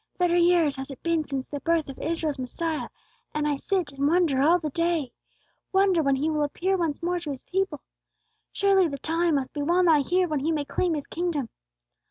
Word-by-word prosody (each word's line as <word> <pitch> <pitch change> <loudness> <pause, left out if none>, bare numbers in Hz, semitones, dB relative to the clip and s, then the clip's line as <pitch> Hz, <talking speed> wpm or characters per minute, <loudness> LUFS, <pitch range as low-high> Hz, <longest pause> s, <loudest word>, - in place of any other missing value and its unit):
"Thirty 350 -1 +3
years 340 -5 +3
has 270 +1 -6
it 270 - -10
been 335 -2 +1
since 270 -2 -4
the 290 - -5
birth 330 0 +1
of 275 - -9
Israel's 315 -3 -2
Messiah; 310 +5 -3 0.5
and 300 0 0
I 295 - +1
sit 355 +2 -1
and 280 0 0
wonder 320 -5 +2
all 325 +5 +5
the 310 -4 -4
day, 335 -4 0 0.6
wonder 385 -3 +3
when 275 -2 +2
He 280 +4 -1
will 305 -1 0
appear 355 +6 0
once 335 -3 -2
more 355 +1 0
to 335 -3 -7
His 270 -3 -5
people. 380 -6 -2 0.7
Surely 390 -2 +3
the 280 -3 -5
time 330 +3 0
must 270 -2 -2
be 295 - -3
well 345 +5 +2
nigh 325 -4 +5
here 360 +5 +1
when 305 -3 -1
He 310 +4 0
may 300 -3 -1
claim 340 +3 0
His 290 - -4
kingdom. 325 -8 -2
320 Hz, 215 wpm, -26 LUFS, 285-345 Hz, 0.7 s, all